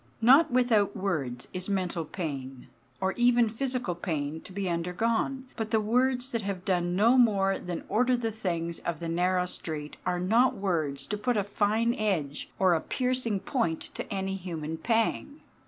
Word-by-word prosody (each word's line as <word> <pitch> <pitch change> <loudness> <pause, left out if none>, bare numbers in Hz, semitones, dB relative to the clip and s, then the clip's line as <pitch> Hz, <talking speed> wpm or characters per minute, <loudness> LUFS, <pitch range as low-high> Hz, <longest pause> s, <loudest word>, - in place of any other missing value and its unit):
Not 265 +8 +6
without 240 -5 +2
words 140 -11 -2
is 185 +1 -3
mental 180 -4 -1
pain, 135 -7 -5 0.3
or 190 0 +1
even 240 -1 +4
physical 245 -3 -2
pain, 160 -3 -3
to - - -13
be 195 0 -3
undergone; 225 +10 -1
but 220 -2 -3
the 220 0 +3
words 250 +4 +1
that 230 - -1
have 195 -3 -4
done 175 -2 +1
no 230 +6 +5
more 195 -5 +3
than 175 -1 -5
order 250 +3 +2
the 225 -2 -2
things 170 -6 -3
of 170 -3 -3
the 170 - -4
narrow 180 +2 +1
street 155 -4 -6
are 180 -1 0
not 225 +8 +3
words 155 -8 -1
to 210 0 -3
put 245 +1 +1
a 205 - +2
fine 215 +3 +1
edge 175 - -1
or 185 -2 +4
a 160 - +1
piercing 250 -6 -1
point 195 -6 -1
to - - -6
any 195 -1 -2
human 165 -4 -4
pang. 230 - 0
195 Hz, 170 wpm, -28 LUFS, 170-230 Hz, 0.3 s, Not